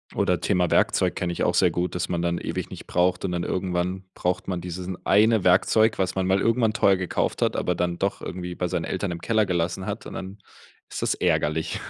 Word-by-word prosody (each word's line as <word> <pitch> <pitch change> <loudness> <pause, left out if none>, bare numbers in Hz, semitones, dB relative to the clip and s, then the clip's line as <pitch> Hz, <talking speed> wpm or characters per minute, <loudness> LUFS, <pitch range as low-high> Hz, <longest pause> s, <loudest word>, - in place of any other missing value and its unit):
Oder 90 -1 +1
Thema 90 -4 +1
Werkzeug, - - +2
kenne 90 - -2
ich - - -2
auch 90 - +1
sehr 90 -1 +4
gut, 90 +2 -2
dass 90 - -2
man 85 -1 -1
dann 85 0 0
ewig - - -4
nicht - - -9
braucht 90 +1 +1
und 95 - -1
dann 85 -1 -2
irgendwann 90 0 -2
braucht 90 0 -2
man 90 -1 -1
diesen 90 +1 -5
1 110 +1 +4
Werkzeug, 110 +4 +4
was 95 -1 0
man 95 -1 0
mal 95 +1 +3
irgendwann 115 -1 +2
teuer 100 -3 +4
gekauft 90 -1 -2
hat, - - +1
aber 90 - 0
dann 85 0 -1
doch 100 +1 -2
irgendwie 90 -1 -5
bei 90 - -1
seinen 90 -1 -2
Eltern 95 -1 -2
im 85 - -6
Keller 110 -2 +2
gelassen 90 0 -1
hat, - - -5
und - - -8
dann 95 +2 -7 0.5
ist - - -5
das - - +1
ärgerlich. 80 +2 0
90 Hz, 225 wpm, -25 LUFS, 90-95 Hz, 0.5 s, sehr